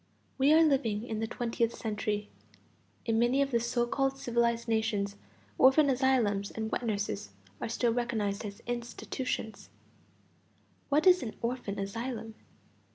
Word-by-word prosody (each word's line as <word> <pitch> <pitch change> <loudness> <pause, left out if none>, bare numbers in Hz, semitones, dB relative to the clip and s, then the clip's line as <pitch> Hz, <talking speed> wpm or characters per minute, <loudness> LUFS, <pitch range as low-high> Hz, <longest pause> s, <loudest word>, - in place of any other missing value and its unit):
We 275 +3 +5
are 320 +1 +7
living 245 -8 +1
in 220 -2 -3
the 225 - -1
twentieth 235 0 -1
century; 210 -1 -2 0.8
in 225 -1 +1
many 240 +3 +3
of 280 0 +2
the 235 - +3
so 240 +1 0
called 270 +2 0
civilized 235 -3 0
nations 220 -3 0 0.4
orphan 275 +2 +6
asylums 245 -7 +2
and 220 0 -4
wet - - -1
nurses 200 - -2 0.3
are - - -2
still 235 0 +1
recognized 220 -4 -1 0.2
institutions. 240 -1 -4 1.2
What 295 +4 +3
is 365 -1 +7
an 220 - -5
orphan 235 -4 -2
asylum? 225 +3 -4
235 Hz, 135 wpm, -30 LUFS, 220-260 Hz, 1.2 s, are